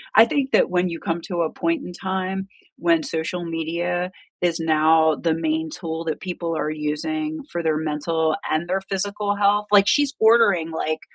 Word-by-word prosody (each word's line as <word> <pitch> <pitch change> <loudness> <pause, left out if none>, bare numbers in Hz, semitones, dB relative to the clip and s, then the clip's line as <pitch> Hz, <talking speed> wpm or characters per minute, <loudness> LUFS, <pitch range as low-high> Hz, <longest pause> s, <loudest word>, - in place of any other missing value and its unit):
I 220 - +9
think 270 +1 -1
that - - +4
when 180 0 +1
you 165 - -5
come 165 0 -2
to 175 -4 -2
a 160 - 0
point 330 -3 -1
in 180 - -7
time 190 +1 -3 0.3
when 170 -2 +2
social 165 +2 -3
media 170 +2 -2 0.3
is 170 -2 +1
now 160 0 +4
the 165 -2 0
main 160 0 -1
tool 165 -1 -4
that 160 - -2
people 170 -3 -4
are 155 - -1
using 305 - -3
for 170 - -2
their 155 -1 +1
mental, 160 +1 0 0.2
and 155 +3 -1
their 190 +1 0
physical 200 +1 -2
health 205 +1 +2
like, 200 -1 +6
she's 290 -1 +3
ordering, 220 -7 +4
like, 155 -1 -2
170 Hz, 185 wpm, -22 LUFS, 160-195 Hz, 0.3 s, I